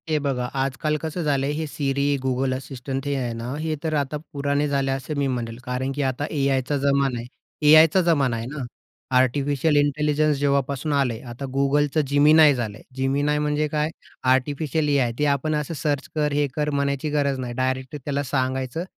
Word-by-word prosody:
हे 155 - +2
बघा, 135 -4 -1
आजकाल 135 +3 -1
कसं 165 +2 -3
झालंय 140 -1 +1
हे 160 +1 -2
Siri, 140 0 0
Google 130 0 0
Assistant 135 +1 -6
हे 145 - 0
आहे 125 -3 -2
ना, 115 +2 -5
हे 155 0 -1
तर 160 -1 -1
आता 145 0 -1 0.2
पुराणे 145 +1 0
झाले 135 -1 0
असे 135 +2 -3
मी 140 -1 0
म्हणेल. 120 -3 -3
कारण 125 +2 -2
की 145 - -1
आता 135 +2 -1
एआयचा 135 -1 0
जमाना 140 -2 +1
आहे. 115 - -6 0.4
एआयचा 160 +4 +7
जमाना 145 -8 +2
आहे 115 - -4
ना. 140 +2 -5 0.5
आर्टिफिशियल 140 +4 +2
इंटेलिजन्स 150 +1 +2
जेव्हापासून 140 +1 0
आलंय, 130 -5 +1
आता 120 +4 -6
Googleचं 145 +2 +2
Gemini 150 +1 +6
झालंय. 110 -4 -4 0.2
Gemini 140 +3 +1
म्हणजे 150 0 0
काय? 150 +1 -1 0.4
Artificial 145 +3 0
AI. 135 -5 +2
ते 150 - +2
आपण 155 +3 -2
असं 150 +2 -2
सर्च 145 -2 -2
कर, 150 -1 +1
हे 145 0 +2
कर 150 -1 0
म्हणायची 140 +1 -1
गरज 140 -2 0
नाही. 125 -1 -4
डायरेक्टली 130 +3 -2
त्याला 145 0 -1
सांगायचं, 130 +3 -2
140 Hz, 175 wpm, -23 LUFS, 130-150 Hz, 0.5 s, एआयचा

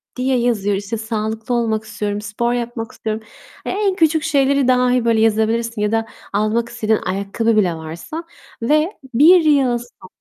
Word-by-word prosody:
diye 255 0 +1
yazıyor. 210 -4 +1
İşte, 205 +3 -4
"Sağlıklı 220 +1 -3
olmak 220 -2 0
istiyorum, 210 -1 -4
spor 235 +4 -2
yapmak 235 -1 -4
istiyorum." 220 0 -4 0.4
En 395 -1 0
küçük 320 -2 +2
şeyleri 280 -3 +2
dahi, 250 -1 +3
böyle, 230 -1 +3
yazabilirsin 225 0 +1
ya 210 - +1
da 225 0 +1 0.3
almak 215 +3 0
istediğin 220 -2 0
ayakkabı 200 +4 0
bile 180 -5 +2
varsa 165 - -7 0.4
ve 305 +8 +2 0.2
1 330 +9 +7
yıl 270 -5 +3
so 235 -5 -13
230 Hz, 155 wpm, -19 LUFS, 215-255 Hz, 0.4 s, 1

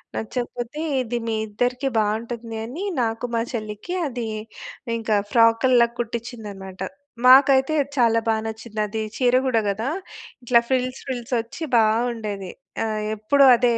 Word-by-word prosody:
నచ్చకపోతే, 240 +4 -4 0.2
ఇది 240 -1 -2
మీ 225 - 0
ఇద్దరికీ 250 +5 -1
బావుంటుంది 225 +2 -2
అని 280 - -6 0.2
నాకు, 225 +1 -1
మా 230 - +2
చెల్లికి 215 - -5
అది 240 -4 -4 0.7
ఇంకా 220 -1 0 0.2
ఫ్రాకుల్లా 235 +1 +5
కుట్టించిందన్నమాట. 220 -5 -6 0.5
మాకైతే 270 +2 +6 0.2
చాలా 230 -2 +4
బా 225 - +3
నచ్చింది. 220 0 -7
అది 220 +2 -3 0.2
చీర 250 -1 +3
గూడా 230 -3 +2
గదా! 220 +6 -1 0.5
ఇట్లా 240 -1 +5
ఫిల్స్ 255 0 0
ఫిల్స్ 250 0 -4
ఒచ్చి 235 +8 -9
బావుండేది. 220 -3 0 0.3
ఆహ్, 215 -1 -2
ఎప్పుడు 275 +7 +4
అదే 240 -1 +3
235 Hz, 125 wpm, -23 LUFS, 220-250 Hz, 0.7 s, మాకైతే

